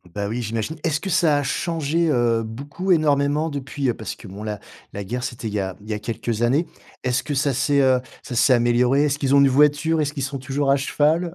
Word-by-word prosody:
Bah, 100 Hz, 0 st, -2 dB
oui, 120 Hz, +3 st, -3 dB
j'imagine. 115 Hz, +7 st, -3 dB
Est-ce 155 Hz, -3 st, 0 dB
que 195 Hz, -, -5 dB
ça 160 Hz, -4 st, +3 dB
a -, -, -2 dB
changé, 165 Hz, +3 st, 0 dB
heu, 120 Hz, -4 st, +2 dB
beaucoup, 145 Hz, +12 st, -4 dB
énormément 150 Hz, -1 st, +2 dB
depuis? 140 Hz, -2 st, -2 dB
Parce 110 Hz, -, -6 dB
que 110 Hz, -, -13 dB
bon, 100 Hz, +2 st, -8 dB
la 105 Hz, -1 st, -4 dB, 0.3 s
la 100 Hz, -, -5 dB
guerre, 120 Hz, +5 st, -4 dB
c'était 120 Hz, -2 st, -5 dB
il 105 Hz, -, -5 dB
y 105 Hz, -, 0 dB
a 95 Hz, -1 st, -3 dB
il 105 Hz, -, -13 dB
y -, -, -1 dB
a 105 Hz, -, -3 dB
quelques 115 Hz, 0 st, -3 dB
années. 135 Hz, +8 st, +2 dB, 0.4 s
Est-ce 130 Hz, 0 st, +1 dB
que 145 Hz, -, -3 dB
ça 140 Hz, 0 st, +1 dB
s'est, 140 Hz, +2 st, +2 dB
heu, 130 Hz, -1 st, +4 dB, 0.2 s
ça 125 Hz, -, -6 dB
s'est 130 Hz, +3 st, +4 dB
amélioré? 120 Hz, +3 st, +3 dB
Est-ce 145 Hz, -1 st, -1 dB
qu'ils 140 Hz, -1 st, +2 dB
ont -, -, +7 dB
une 140 Hz, -, +5 dB
voiture? 150 Hz, +4 st, +3 dB
Est-ce 150 Hz, 0 st, -1 dB
qu'ils 140 Hz, -3 st, -4 dB
sont 135 Hz, +1 st, -4 dB
toujours 135 Hz, +2 st, 0 dB
à 140 Hz, -, +4 dB
cheval? 155 Hz, +5 st, +1 dB
135 Hz, 245 wpm, -22 LUFS, 120-150 Hz, 0.4 s, ont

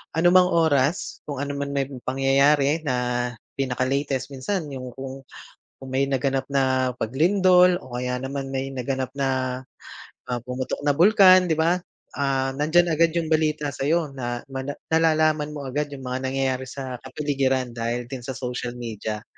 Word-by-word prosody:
anumang 180 Hz, +2 st, +5 dB
oras, 160 Hz, -2 st, +1 dB
kung 145 Hz, -1 st, -3 dB
ano 145 Hz, -, -3 dB
man 140 Hz, 0 st, -3 dB
may 140 Hz, -, +2 dB, 0.2 s
pangyayari 140 Hz, +3 st, +3 dB
na 130 Hz, -, +1 dB, 0.6 s
pinaka-latest 135 Hz, +1 st, -1 dB
minsan 150 Hz, +3 st, -3 dB
'yung 130 Hz, -2 st, -7 dB
kung 135 Hz, 0 st, -8 dB, 0.5 s
kung 135 Hz, -1 st, -9 dB
may 135 Hz, -, +3 dB
naganap 135 Hz, 0 st, 0 dB
na 130 Hz, -2 st, +2 dB
paglindol 180 Hz, -, +4 dB
o 120 Hz, -7 st, -10 dB
kaya 125 Hz, 0 st, -2 dB
naman 135 Hz, 0 st, -4 dB
may 135 Hz, 0 st, -2 dB
naganap 130 Hz, 0 st, -3 dB
na, 130 Hz, -2 st, -1 dB, 0.7 s
ah, 125 Hz, -, -1 dB
pumutok 125 Hz, +1 st, -3 dB
na 145 Hz, -, +4 dB
bulkan, 185 Hz, +1 st, +6 dB
di 160 Hz, -, +1 dB
ba, 170 Hz, +3 st, +2 dB, 0.3 s
ah, 135 Hz, -1 st, 0 dB
nandiyan 160 Hz, +4 st, +2 dB
agad 165 Hz, +1 st, +2 dB
'yung 160 Hz, -1 st, 0 dB
balita 155 Hz, -2 st, +1 dB
sa'yo 150 Hz, +1 st, 0 dB
na 120 Hz, -2 st, -4 dB
mana 135 Hz, +2 st, -4 dB, 0.2 s
nalalaman 155 Hz, -2 st, +2 dB
mo 140 Hz, -, -5 dB
agad 145 Hz, +3 st, -2 dB
'yung 135 Hz, -2 st, -9 dB
mga 130 Hz, +1 st, -3 dB
nangyayari 130 Hz, -1 st, -1 dB
sa 130 Hz, -3 st, -6 dB
kapaligiran 130 Hz, -2 st, -1 dB
dahil 120 Hz, +1 st, -2 dB
din 130 Hz, +1 st, -7 dB
sa 130 Hz, +2 st, -6 dB
social 125 Hz, -1 st, -4 dB
media. 110 Hz, -2 st, -5 dB
135 Hz, 155 wpm, -24 LUFS, 130-155 Hz, 0.7 s, bulkan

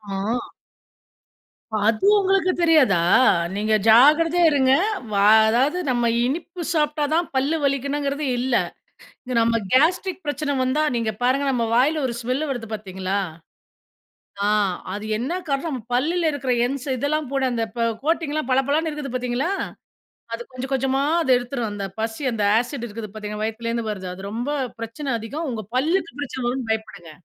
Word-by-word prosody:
ஆமா. 210 Hz, +5 st, -1 dB, 1.5 s
அது 225 Hz, -, +1 dB
உங்களுக்கு 390 Hz, -1 st, +2 dB
தெரியாதா? 305 Hz, -, +4 dB, 0.6 s
நீங்க 215 Hz, +2 st, 0 dB
ஜாக்கிரதையா 305 Hz, +9 st, +6 dB
இருங்க. 265 Hz, -3 st, +3 dB, 0.4 s
வா 200 Hz, -1 st, +2 dB, 0.3 s
அதாவது 265 Hz, +9 st, +2 dB
நம்ம 240 Hz, -2 st, +1 dB, 0.2 s
இனிப்பு 335 Hz, +6 st, -4 dB
சாப்பிட்டா 300 Hz, -1 st, +1 dB
தான் 340 Hz, +2 st, +1 dB
பல்லு 280 Hz, +5 st, +1 dB
வலிக்கணுங்குறது 280 Hz, +1 st, -1 dB
இல்ல. 250 Hz, 0 st, 0 dB, 0.9 s
நம்ம 230 Hz, 0 st, +2 dB
கேஸ்ட்ரிக் 360 Hz, +7 st, +2 dB
பிரச்சனை 290 Hz, 0 st, -1 dB
வந்தா, 260 Hz, +4 st, +1 dB
நீங்க 225 Hz, -2 st, -1 dB
பாருங்க 265 Hz, +3 st, +2 dB
நம்ம 235 Hz, -2 st, 0 dB
வாயில 290 Hz, +6 st, +3 dB
ஒரு 235 Hz, -, -3 dB
ஸ்மெல்லு 255 Hz, +6 st, -2 dB
வருது 240 Hz, -4 st, -4 dB
பார்த்தீங்களா? 190 Hz, -1 st, -3 dB, 1.3 s
ஆ -, -, +2 dB, 0.5 s
அது 205 Hz, +1 st, -5 dB
என்ன 255 Hz, +8 st, -3 dB, 0.2 s
காரணம் 275 Hz, +3 st, -1 dB
நம்ம 255 Hz, -4 st, -4 dB
பல்லுல 325 Hz, +6 st, +1 dB
இருக்குற 270 Hz, -3 st, -2 dB
என்ஸ் 270 Hz, +1 st, -4 dB
இதெல்லாம் 285 Hz, +3 st, -1 dB
போட 275 Hz, -1 st, 0 dB
அந்த 230 Hz, -1 st, 0 dB
ப -, -, -3 dB, 0.2 s
கோட்டிங்லாம் 310 Hz, -3 st, -1 dB
பளபளன்னு 280 Hz, +5 st, +1 dB
இருக்குது 295 Hz, -4 st, -6 dB
பார்த்தீங்களா, 250 Hz, +5 st, -1 dB, 0.8 s
அது 230 Hz, -, -4 dB
கொஞ்சம் 255 Hz, +1 st, -6 dB
கொஞ்சமா 270 Hz, +1 st, +1 dB, 0.2 s
அத 320 Hz, -, -3 dB
எடுத்துரும், 245 Hz, -2 st, -3 dB
அந்த 200 Hz, -1 st, -4 dB
பசி 225 Hz, +5 st, -3 dB
அந்த 215 Hz, -2 st, -1 dB, 0.2 s
ஆசிட் 245 Hz, 0 st, -4 dB
இருக்குது 215 Hz, 0 st, -7 dB
பார்த்தீங்களா 210 Hz, -1 st, -6 dB
வயித்துலேருந்து 230 Hz, +1 st, -3 dB
வருது. 190 Hz, -3 st, -6 dB
அது 190 Hz, +1 st, -10 dB
ரொம்ப 240 Hz, +5 st, -3 dB, 0.3 s
பிரச்சனை 230 Hz, +6 st, -5 dB
அதிகம், 285 Hz, +9 st, -5 dB
உங்க 220 Hz, -2 st, -4 dB
பல்லுக்கு 335 Hz, +5 st, 0 dB
பிரச்சனை 265 Hz, -3 st, -4 dB
வரும்னு 245 Hz, -1 st, -3 dB
பயப்படுங்க. 200 Hz, -6 st, -5 dB
260 Hz, 145 wpm, -22 LUFS, 230-300 Hz, 1.5 s, ஜாக்கிரதையா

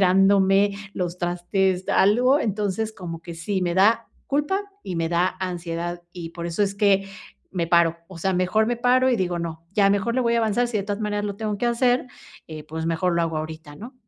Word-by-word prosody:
esperándome, 195 Hz, +1 st, +4 dB, 0.2 s
los 180 Hz, -1 st, -3 dB
trastes, 180 Hz, +1 st, 0 dB
algo, 245 Hz, +8 st, +4 dB
entonces, 210 Hz, -1 st, -1 dB
como 170 Hz, -5 st, -7 dB
que 170 Hz, 0 st, -8 dB
sí, 190 Hz, +4 st, -2 dB
me 175 Hz, -1 st, 0 dB
da 220 Hz, +5 st, +4 dB, 0.2 s
culpa 295 Hz, +8 st, 0 dB, 0.2 s
y 180 Hz, -, -5 dB
me 165 Hz, 0 st, 0 dB
da 175 Hz, +2 st, +1 dB
ansiedad, 175 Hz, -1 st, -4 dB
y 170 Hz, -2 st, -7 dB
por 170 Hz, 0 st, -6 dB
eso 170 Hz, +4 st, -1 dB
es 195 Hz, 0 st, 0 dB
que 200 Hz, -1 st, +3 dB, 0.4 s
me 175 Hz, -3 st, -1 dB
paro. 170 Hz, -1 st, +3 dB
O 190 Hz, -, -11 dB
sea, 190 Hz, +3 st, 0 dB
mejor 185 Hz, +4 st, +2 dB
me 240 Hz, +1 st, -1 dB
paro 255 Hz, +2 st, +3 dB
y 245 Hz, -, +2 dB
digo: 180 Hz, -3 st, -1 dB
"No, 165 Hz, -1 st, -5 dB
ya 200 Hz, -1 st, +4 dB
mejor 205 Hz, +4 st, 0 dB
le 255 Hz, -, +2 dB
voy 235 Hz, -1 st, +2 dB
a -, -, +3 dB
avanzar", 230 Hz, +2 st, +1 dB
si 225 Hz, -, -1 dB
de 200 Hz, -, -3 dB
todas 205 Hz, +1 st, -3 dB
maneras, 205 Hz, 0 st, -1 dB
lo 200 Hz, -1 st, -4 dB
tengo 210 Hz, -1 st, -3 dB
que 240 Hz, -, 0 dB
hacer, 245 Hz, +1 st, +2 dB, 0.4 s
eh, 155 Hz, -1 st, -8 dB
y -, -, -10 dB
pues 160 Hz, +1 st, -5 dB
mejor 170 Hz, +2 st, 0 dB
lo 170 Hz, -, +2 dB
hago 165 Hz, -1 st, -1 dB
ahorita, 155 Hz, -1 st, -6 dB
¿no? 240 Hz, -, -10 dB
190 Hz, 220 wpm, -24 LUFS, 170-215 Hz, 0.4 s, esperándome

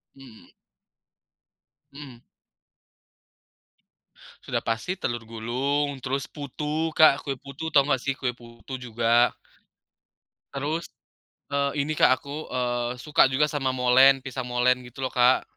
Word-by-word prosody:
Hmm. 130 Hz, -5 st, -16 dB, 1.4 s
Mhm. 135 Hz, -4 st, -11 dB, 2.2 s
Sudah -, -, -3 dB
pasti 120 Hz, +12 st, -2 dB
telur 120 Hz, -9 st, -3 dB
gulung, 130 Hz, +5 st, -2 dB
terus 135 Hz, +2 st, -2 dB
putu 150 Hz, +2 st, -4 dB
Kak, 155 Hz, -3 st, +6 dB
kue 135 Hz, -2 st, -4 dB
putu, 140 Hz, +5 st, -7 dB
tahu 140 Hz, -3 st, +4 dB
nggak 135 Hz, -4 st, 0 dB
sih? 140 Hz, -, -1 dB
Kue 125 Hz, -3 st, -2 dB
putu 120 Hz, +2 st, -13 dB
juga 120 Hz, 0 st, +2 dB, 1.2 s
terus, 150 Hz, +5 st, -2 dB, 0.7 s
eee, 140 Hz, 0 st, 0 dB
ini 150 Hz, +2 st, -2 dB
Kak, 130 Hz, -, +4 dB
aku, 145 Hz, +2 st, -7 dB
eee, 120 Hz, -1 st, -2 dB
suka 145 Hz, +4 st, +3 dB
juga 140 Hz, +3 st, +1 dB
sama 135 Hz, -3 st, -1 dB
molen, 130 Hz, +2 st, +5 dB
pisang 130 Hz, -1 st, -5 dB
molen 125 Hz, +1 st, +2 dB
gitu 120 Hz, +2 st, -10 dB
loh 130 Hz, -, -1 dB
Kak. 125 Hz, +1 st, +4 dB
130 Hz, 125 wpm, -25 LUFS, 125-145 Hz, 2.2 s, Kak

